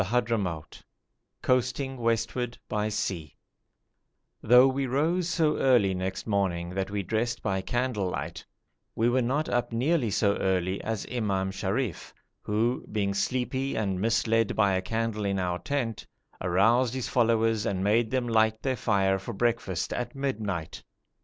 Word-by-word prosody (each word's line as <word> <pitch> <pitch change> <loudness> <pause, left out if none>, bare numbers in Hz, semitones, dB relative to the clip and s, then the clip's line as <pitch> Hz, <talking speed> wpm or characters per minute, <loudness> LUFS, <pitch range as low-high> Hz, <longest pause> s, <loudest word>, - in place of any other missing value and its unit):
CHAPTER 120 0 +1
XVII 90 -7 -4 0.6
COASTING 130 +1 0
WESTWARD 115 +1 -1
BY 105 0 -1
SEA 85 -7 -3 1.1
Though 125 +3 +7
we 135 0 -1
rose 165 +7 +1
so 160 -3 +2
early 120 -8 +4
next 95 0 -3
morning 95 -5 0
that 95 +1 -2
we 100 0 -2
dressed 115 +5 -1
by 95 -2 0
candle 120 -2 -1
light, 80 0 -5 0.5
we 115 +2 +2
were 130 +1 +2
not 140 +6 0
up 120 0 0
nearly 125 +2 +1
so 100 0 +2
early 95 0 0
as 110 -2 -3
Imam 100 -5 0
Sharif, 95 - -3 0.3
who, 115 +4 0
being 100 -2 0
sleepy 130 +6 -1
and 95 -4 -1
misled 115 0 +2
by 100 -3 +3
a 95 - +1
candle 110 +1 -2
in 100 -1 0
our 90 -1 -1
tent, 125 -6 -3 0.3
aroused 115 +8 +3
his 130 - -2
followers 115 -2 +2
and 95 -1 -1
made 110 +3 +2
them 125 -1 0
light 110 -1 +2
their 130 -2 0
fire 95 -3 +2
for 115 +5 -6
breakfast 115 -5 -1
at 120 +1 -4
midnight. 105 - -3
110 Hz, 150 wpm, -28 LUFS, 95-125 Hz, 1.1 s, Though